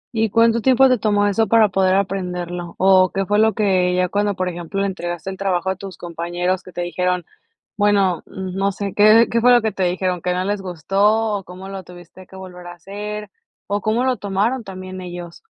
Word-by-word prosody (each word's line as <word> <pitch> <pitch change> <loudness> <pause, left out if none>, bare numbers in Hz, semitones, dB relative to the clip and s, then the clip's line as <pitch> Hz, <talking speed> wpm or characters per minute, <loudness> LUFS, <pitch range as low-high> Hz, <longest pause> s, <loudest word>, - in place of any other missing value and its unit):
¿Y 220 0 +1
cuánto 230 +2 +3
tiempo 265 +1 +5
te 250 -3 +2
tomó 205 -1 +2
eso 205 +2 +1
para 220 0 +4
poder 190 0 +2
aprenderlo? 180 -3 -3
¿O 185 -1 +5
qué 195 0 -1
fue 205 +2 +1
lo 220 -1 +4
que 185 -3 +2
ya, 180 -1 +1
cuando, 205 -1 0
por 185 0 -2
ejemplo, 180 +3 -3
entregaste 175 -1 -4
el 190 - -8
trabajo 190 -1 -1
a - - -3
tus 195 0 -9
compañeros, 175 +2 -3
que 185 - -13
te 175 - -5
dijeron? 180 0 -1 0.5
Bueno, 200 -4 +2
no 190 +1 -3
sé, 200 0 -5
¿qué 215 +3 +6
qué 230 0 +1
fue 250 - +6
lo 245 - +6
que 220 - -1
te 195 -1 -4
dijeron, 180 -1 -1
qué 180 - 0
no 180 +1 -1
les 205 0 -2
gustó, 200 +5 +1
o 195 - -7
cómo 185 +2 -10
lo 195 -1 -6
tuviste 180 +1 -14
que 190 - -14
volver 180 -2 -10
a - - -7
hacer, 205 +3 -7 0.4
o 205 0 -2
cómo 225 +4 +1
lo 255 -1 +1
tomaron 210 +5 -1
también 185 -1 -8
ellos? 175 -1 -8
190 Hz, 215 wpm, -20 LUFS, 180-205 Hz, 0.5 s, qué